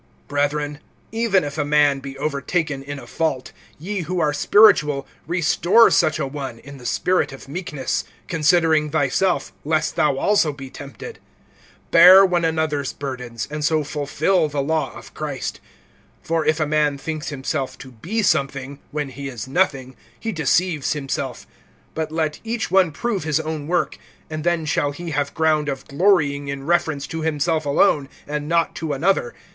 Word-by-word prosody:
BRETHREN, 145 0 -1 0.3
even 225 -5 +2
if 145 +1 -5
a - - +2
man 145 -1 +3
be 135 0 -8
overtaken 150 +1 -2
in 145 +1 -6
a - - -10
fault, 150 -6 -2 0.3
ye 195 +6 -4
who 180 +1 -2
are 150 -3 +1
spiritual 150 -6 +4 0.2
restore 175 +6 +4
such 155 -3 +3
a - - -1
one 135 -3 -6
in 140 +3 -12
the 125 - -6
spirit 185 -5 +1
of 135 0 -11
meekness; 150 -3 -3 0.2
considering 160 -1 +3
thyself, 160 +5 0
lest 155 +1 0
thou 150 -4 +2
also 200 -2 +2
be 135 -2 -10
tempted. 145 - -9 0.7
(2)Bear 185 +3 +9
one 175 -2 0
another's 160 -4 0
burdens, 125 -5 -5
and 150 0 -4
so 155 +1 +2
fulfill[6:2] 150 +4 0
the 145 -1 -1
law 155 -1 0
of - - -13
Christ. - - -4 0.7
(3)For 165 -1 0
if 155 0 +2
a 155 - +2
man 150 -1 +1
thinks 155 +2 -5
himself 135 -1 -3
to 135 - -11
be 180 - -3
something, 140 -3 0
when 150 -2 -3
he 140 +1 -7
is 125 -3 -6
nothing, 135 -5 0 0.2
he 225 - -3
deceives 165 -2 +1
himself. 135 -3 -4 0.5
(4)But 160 -1 -1
let 155 -1 -2
each 230 0 -3
one 190 -3 +4
prove 200 +4 -2
his 155 0 +1
own 155 -2 -4
work, 175 +1 0 0.3
and 155 -1 -4
then 170 -2 +1
shall 145 -1 +1
he 170 +3 -6
have 145 -1 -2
ground 155 -2 +2
of 135 -1 -5
glorying 145 -4 +2
in 140 -1 -5
reference 160 -4 +1
to 165 +3 -5
himself 155 0 0
alone, 140 0 +3 0.2
and 150 0 -4
not 170 -1 +2
to 155 -2 -2
another. 145 -3 0
150 Hz, 165 wpm, -21 LUFS, 140-165 Hz, 0.7 s, 2)Bear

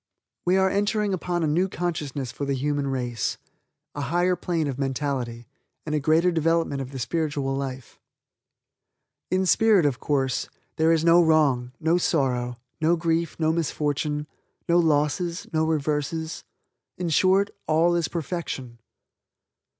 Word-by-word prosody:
We 185 +2 +4
are 190 0 +4
entering 205 +1 0
upon 175 -1 -1
a - - +2
new 175 +6 +1
consciousness 150 -8 -3
for 140 - -4
the 140 0 0
human 145 +1 -1
race, 125 -4 -2 0.6
a 145 - -4
higher 175 +6 +1
plane 170 -3 -1
of 140 -2 -4
mentality, 130 -4 -2 0.4
and 150 - -3
a 150 - +2
greater 160 +5 +3
development 165 -3 +1
of 130 - -6
the 135 - -6
spiritual 140 0 -1
life. 130 -2 -6 1.3
In 185 +1 +1
spirit, 210 -2 +4
of 135 -4 0
course, 135 -3 -1 0.3
there 160 +1 +4
is 165 0 +2
no 170 +1 +6
wrong, 140 -6 +2
no 165 +3 +2
sorrow, 125 -7 0 0.2
no 165 +2 +4
grief, 165 0 -1
no 160 0 +2
misfortune, 150 -2 -1 0.4
no 170 +1 +4
losses, 165 +2 +1
no 160 0 +2
reverses. 155 +1 -2 0.5
In 175 -2 -2
short 190 +5 +3 0.2
all 165 +3 +3
is 170 -1 +1
perfection. 150 -7 -5
155 Hz, 140 wpm, -25 LUFS, 140-170 Hz, 1.3 s, no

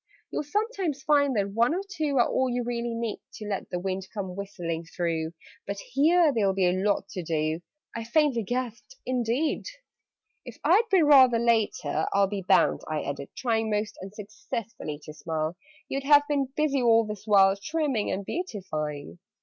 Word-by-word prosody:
"You'll - - -1
sometimes 365 - -2
find 285 -3 +3
that 200 -1 0
one 235 +9 +2
or 380 - -2
two 305 -8 -1
Are 240 - +5
all 260 0 +1
you 245 0 -1
really 235 -1 -3
need 230 -2 -3
To 215 - -8
let 200 -2 -3
the 180 - -2
wind 190 +1 -3
come 190 -4 -5
whistling 180 -5 -4
through 165 -1 -2 0.3
But 200 0 -3
here 310 - +3
there'll 200 -5 +1
be 190 -1 +2
a 180 - +4
lot 195 +3 0
to 185 - -5
do!" 160 0 -1 0.3
I 230 - -3
faintly 270 0 +2
gasped 245 - -4
"Indeed! 255 +4 0 0.8
"If - - -10
I'd 455 +1 +4
been 370 -6 +4
rather 260 -5 +7
later, 230 -2 +1
I'll 200 0 +5
Be 195 0 -4
bound," 185 - +3
I 155 -1 -2
added, 140 0 -5
trying 225 -3 0
(Most 210 0 -1
unsuccessfully) 210 - -6
to 155 - -9
smile, 160 +1 -3 0.3
"You'd 275 0 -3
have 290 0 +7
been 285 -3 +1
busy 300 -3 +1
all 230 -1 +5
this 210 0 -7
while, 195 -2 +6
Trimming 270 0 -1
and 195 +1 -3
beautifying?" 165 - -4
225 Hz, 175 wpm, -27 LUFS, 190-275 Hz, 0.8 s, rather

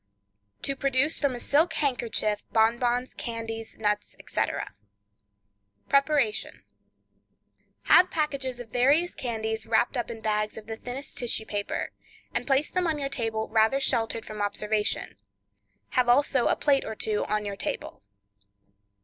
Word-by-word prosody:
To 275 - 0
Produce 275 +2 +1
from 280 -4 +1
a - - -6
Silk 305 +7 +2
Handkerchief 235 -6 0
Bonbons, 240 +3 +2
Candies, 225 -1 -5
Nuts, 210 -1 -1
etc.— - - -2 1.2
Preparation. 275 -5 +2 1.2
Have 365 +1 +6
packages 275 -5 -2
of 240 -2 -8
various 280 +9 +3
candies, 220 -2 -3
wrapped 230 +4 +2
up 240 - -2
in 230 -1 -6
bags 215 -1 -1
of 220 - -8
the 225 0 -5
thinnest 250 +5 -5
tissue 230 -2 0
paper, 205 -1 -2 0.4
and 240 +1 -1
place 275 +1 +2
them 365 -1 +1
on 315 -2 0
your 275 -1 -2
table 225 -4 -2
rather 220 +4 +3
sheltered 230 -4 0
from 215 -1 -6
observation. 210 +1 -1 0.7
Have 250 -2 +2
also 260 0 +4
a - - +3
plate 280 -2 +2
or 220 - -5
two 215 -1 -1
on 210 0 -1
your 200 -1 -3
table. - - -4
240 Hz, 140 wpm, -27 LUFS, 220-275 Hz, 1.2 s, Have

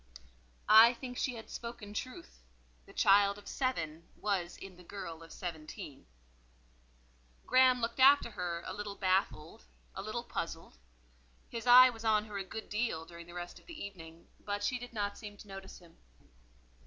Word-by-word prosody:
I 225 +3 +8
think 250 0 -7
she 250 0 -1
had 225 - -9
spoken 235 -3 -7
truth: 210 - -7 0.5
the - - -13
child 200 0 +4
of 205 - -14
seven 170 - -2
was 185 -4 -2
in 195 -1 -10
the 180 - -15
girl 170 -3 -7
of 165 - -13
seventeen. 155 - -7 1.4
Graham 255 0 +5
looked 230 +3 -2
after 270 -2 +6
her 175 -4 -4
a - - -5
little 205 -1 -5
baffled, 185 - -1 0.3
a - - -5
little - - -4
puzzled; - - -6 0.7
his 230 +1 -6
eye 255 +1 +10
was 225 -1 -11
on 215 -1 +3
her 210 -2 -5
a - - -2
good 220 +3 -7
deal 210 -7 -2
during 170 0 -11
the 175 - -12
rest 175 0 -7
of - - -25
the 335 -3 -9
evening, 165 -4 -9 0.2
but 205 0 -3
she 250 +3 0
did 245 0 -9
not 205 -3 -3
seem 205 -2 -9
to 205 - -13
notice 195 -1 -9
him. 170 -2 -18
205 Hz, 170 wpm, -33 LUFS, 175-235 Hz, 1.4 s, eye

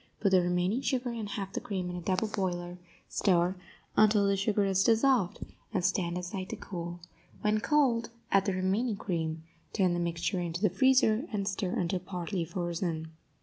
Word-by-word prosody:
Put 195 - +2
the 185 -1 +6
remaining 180 +7 +1
sugar 255 -3 -1
and 225 -3 -4
half 195 -2 -4
the - - -1
cream 185 -3 -3
in - - -5
a 175 - -5
double 185 +4 0
boiler; 180 -3 -3 0.3
stir 180 -1 +2 0.4
until 210 -1 +5
the 200 - +3
sugar 205 +1 +1
is 195 0 +2
dissolved, 230 -3 +3 0.3
and 190 -5 0
stand 180 -2 0
aside 185 +1 -5
to - - -3
cool; 175 -1 -6 0.4
when 215 0 +2
cold, 240 -3 +2 0.2
add 195 -1 +4
the 195 - +1
remaining 195 +5 0
cream, 160 -4 -3 0.3
turn 185 -4 +2
the 175 - -1
mixture 170 +2 -1
into 170 -1 -3
the 210 - +4
freezer, 255 - +4
and 200 -3 -2
stir 190 -2 -1
until 180 +1 0
partly 180 0 -3
frozen. 170 -1 -3
190 Hz, 180 wpm, -30 LUFS, 175-210 Hz, 0.4 s, the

